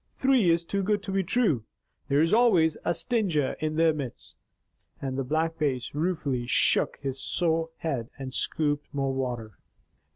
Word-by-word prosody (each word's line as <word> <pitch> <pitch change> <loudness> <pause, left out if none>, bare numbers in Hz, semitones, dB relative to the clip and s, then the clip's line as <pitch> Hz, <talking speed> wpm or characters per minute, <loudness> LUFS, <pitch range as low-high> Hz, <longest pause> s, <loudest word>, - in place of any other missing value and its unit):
Three 260 -8 +3
is 170 0 +2
too 200 +3 -1
good 205 +1 0
to 195 - -5
be 195 0 +1
true! 180 - +1 0.4
There 140 +3 +3
is 165 - +1
always 190 -10 +4
a - - +1
stinger 175 - 0
in 155 0 -2
their 165 0 +4
midst." 140 -5 -7 0.6
And 135 -1 -3
the 135 - -1
Black 160 +5 -1
Bass 135 -5 -1
ruefully 145 -6 -1
shook 120 - +2
his 135 -1 -5
sore 165 -2 0
head 135 -7 -3
and 135 -2 -6
scooped 145 -1 -1
more 135 -1 0
water. 120 -5 -4
155 Hz, 165 wpm, -27 LUFS, 135-175 Hz, 0.6 s, always